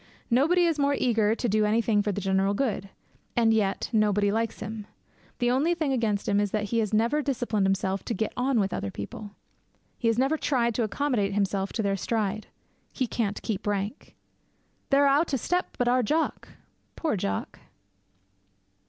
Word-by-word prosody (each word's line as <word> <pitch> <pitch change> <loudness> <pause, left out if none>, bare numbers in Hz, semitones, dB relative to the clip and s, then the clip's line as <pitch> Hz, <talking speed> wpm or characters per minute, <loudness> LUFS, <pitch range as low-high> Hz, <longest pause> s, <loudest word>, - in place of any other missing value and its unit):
Nobody 325 +9 +4
is 325 -3 0
more 280 0 +2
eager 225 -3 +2
to 240 - -2
do 215 0 +2
anything 215 0 +2
for 205 0 -1
the 200 - -3
general 195 +1 +1
good. 200 -6 -1 0.5
And 225 -2 +4
yet 200 -3 0
nobody 205 -2 +3
likes 225 +1 -1
him. 215 -1 -6 0.5
The 245 -1 +1
only 300 +7 +2
thing 310 -5 0
against 220 -5 0
him 200 0 +2
is 205 0 +1
that 210 +1 -1
he 230 - +3
has 215 -3 0
never 230 +8 +2
disciplined 245 -8 0
himself 195 0 -1
to 235 - -2
get 220 +3 -2
on 250 -1 +1
with 195 -2 0
other 100 - -3
people. 200 - -8 0.6
He 235 - 0
has 230 0 +2
never 270 +5 +2
tried 235 -4 +1
to 235 - 0
accommodate 215 -4 0
himself 195 -1 0
to 220 - -1
their 195 -1 0
stride. 215 0 -2 0.4
He 260 - -1
can't 215 -4 -2
keep 210 -2 -3
rank. 205 +4 -3 0.7
They're 280 0 +4
a' 280 +1 +5
oot 320 -4 -1
o' - - +1
step 360 +9 -2
but 245 - +1
our 250 +1 +3
Jock! 305 +8 -1 0.5
Poor 315 -8 -1
Jock! 100 - -3
220 Hz, 185 wpm, -27 LUFS, 205-255 Hz, 0.7 s, a